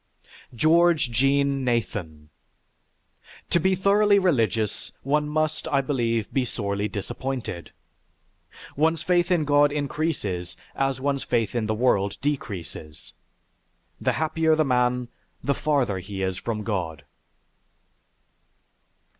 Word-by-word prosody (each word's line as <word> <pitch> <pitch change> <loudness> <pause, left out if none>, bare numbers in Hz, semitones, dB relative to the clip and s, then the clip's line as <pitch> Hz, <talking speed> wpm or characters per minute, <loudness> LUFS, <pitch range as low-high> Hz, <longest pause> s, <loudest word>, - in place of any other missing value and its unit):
GEORGE 160 0 +4
JEAN 135 +3 +2
NATHAN 90 -11 -2 1.2
To 170 - +4
be 190 +3 +2
thoroughly 200 +2 +4
religious, 115 - 0
one 150 +2 +1
must, 155 0 -1
I 140 -1 +2
believe, 115 -5 -1
be 135 - +2
sorely 100 -4 -2
disappointed. 110 -2 -5 1.1
One's 160 +2 +1
faith 175 0 +2
in 170 -4 +2
God 145 0 +4
increases 140 - -2 0.2
as 135 -1 0
one's 140 0 -1
faith 115 -4 0
in 115 -3 -1
the 110 - 0
world 100 -4 +1
decreases. 95 - -5 0.9
The - - +1
happier 160 0 +2
the 155 0 +2
man, 125 -1 +1 0.4
the 140 - +1
farther 135 -11 0
he 95 +1 -5
is 95 0 -2
from 110 -2 -3
God. 85 -8 -3
130 Hz, 115 wpm, -25 LUFS, 105-155 Hz, 1.2 s, GEORGE